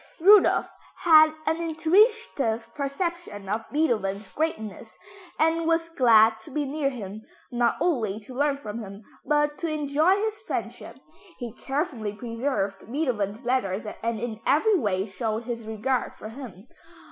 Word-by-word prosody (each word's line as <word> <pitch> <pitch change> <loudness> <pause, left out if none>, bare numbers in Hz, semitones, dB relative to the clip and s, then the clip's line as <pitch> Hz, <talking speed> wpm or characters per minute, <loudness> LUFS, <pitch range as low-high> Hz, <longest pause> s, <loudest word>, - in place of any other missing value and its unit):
Rudolph 400 +4 +6 0.4
had 315 -3 +7
an 320 +1 +1
intuitive 320 - +1
perception 280 - -4
of 220 +3 -3
Beethoven's 215 -10 0
greatness 220 - -4 0.4
and 325 +1 +2
was 330 0 +1
glad 225 -7 +5
to 220 - -11
be 295 +1 -2
near 280 0 -1
him, 215 -5 -7 0.3
not 240 -1 +1
only 220 - 0
to 235 +5 -11
learn 285 +2 +1
from 220 -4 -6
him, 200 -1 -9 0.2
but 295 0 +1
to 335 - -2
enjoy 305 +4 +2
his 425 0 -2
friendship. 450 - -5 0.4
He 240 -4 -6
carefully 265 - -3
preserved 230 -3 -3
Beethoven's 235 -7 -2
letters 220 -5 0 0.2
and 230 -1 -2
in 225 -1 -4
every 360 - +3
way 200 - 0
showed 220 +3 -3
his 230 -2 -5
regard 240 +4 -1
for 215 - -9
him. 230 -4 -10
255 Hz, 140 wpm, -26 LUFS, 220-315 Hz, 0.4 s, had